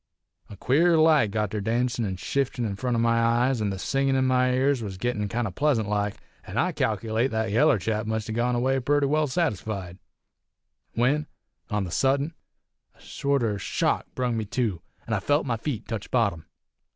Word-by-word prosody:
A 100 - -10
queer 165 - +3
light 155 -8 +5
got 105 -1 -1
ter 105 - -2
dancin' 120 +2 0
an' 95 -2 -3
shiftin' 120 0 -2
front 120 +4 -1
o' - - +1
my 115 0 +2
eyes, 120 +1 +2
an' 105 - 0
the 95 - -3
singin' 135 +6 0
in 130 0 +2
my 125 0 +3
ears 130 0 +2
was 100 -4 -5
gittin' 105 -1 -2
kind 120 +3 -1
o' - - -5
pleasant 125 -1 +1
like, 105 -1 -1 0.3
an' - - -6
I - - +2
calc'late 110 +4 0
that 110 -3 -1
yaller 130 +4 +4
chap 110 +3 -2
must 110 -1 -2
a - - -4
gone 120 +2 0
away 130 +2 +1
purty 145 +3 +2
well 150 +2 +2
satisfied; 105 - -2 1.0
when, 145 +6 +1 0.4
on 105 -1 0
the 90 - -6
suddent, 140 - +1 0.6
a - - -24
sorter 120 -8 -1
shock - - 0
brung 125 -2 0
me 110 - -2
to, 105 -4 -2 0.2
an' 115 - -3
I 105 - +1
felt 145 +9 +1
my 120 -3 0
feet 120 -1 -4
tech 110 -3 -5
bottom. 100 -10 0
115 Hz, 190 wpm, -26 LUFS, 105-135 Hz, 1.0 s, light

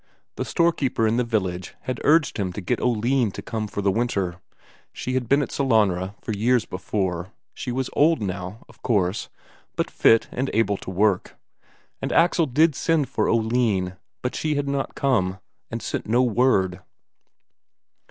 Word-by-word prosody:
The - - -3
storekeeper 155 -9 +1
in 110 +2 +2
the 125 - +2
village 95 -6 -2
had 130 -1 -4
urged 150 -2 +3
him 95 -3 -1
to 105 - -5
get 90 - -1
Oline 120 0 +2
to - - -6
come 110 -2 -3
for 105 -1 -4
the 100 - +3
winter, 95 -6 -1 0.5
she 130 - -4
had 125 -3 -1
been 140 +1 +4
at - - -6
Sellanraa 105 -8 +1
for - - -3
years 115 +1 +2
before; 90 -1 -3 0.2
she 125 - -5
was 130 +1 -1
old 160 +3 +4
now, 95 +1 -5
of - - -20
course, 100 -4 0 0.5
but - - -1
fit 115 - +4
and 130 +2 -2
able 105 -3 +2
to - - -8
work. 95 0 +1 0.7
And - - -2
Axel 170 -1 +3
did 155 +5 +3
send 155 0 +1
for - - 0
Oline, 110 -5 +1 0.3
but 125 - -1
she 155 -1 -1
had 145 0 -1
not 140 -1 -2
come, 100 -9 +1 0.3
and 115 0 -5
sent - - -3
no 120 +4 +3
word. 110 -7 +2
115 Hz, 170 wpm, -24 LUFS, 95-130 Hz, 0.7 s, been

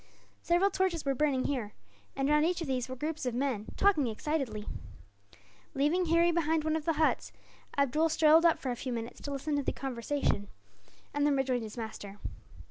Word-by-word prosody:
Several 355 +4 +3
torches 370 -5 0
were 275 - +2
burning 270 -1 +1
here, 240 -7 -2 0.4
and 270 0 0
round 300 +1 +4
each 345 +2 +1
of 335 - -3
these 255 -1 -1
were 255 - -4
groups 305 +4 -4
of 240 - -2
men, 245 -5 -1
talking 370 -10 +3
excitedly. 230 -2 -2 1.1
Leaving 305 +7 +2
Harry 335 +1 +4
behind 325 -2 +1
one 315 0 0
of 315 -2 -3
the 330 - +2
huts, 310 0 +1 0.5
Abdool 285 +4 +2
strolled 315 +1 +5
up 335 -1 +5
for 260 - -3
a - - -2
few 255 +1 -5
minutes, 235 0 -5
to 285 - -5
listen 285 +2 -2
to - - +1
the - - -1
conversation, 255 -4 -2 0.7
and 290 - 0
then 290 -1 +3
rejoined 260 -2 0
his 220 +1 -8
master. 210 -3 -6
285 Hz, 190 wpm, -31 LUFS, 250-320 Hz, 1.1 s, strolled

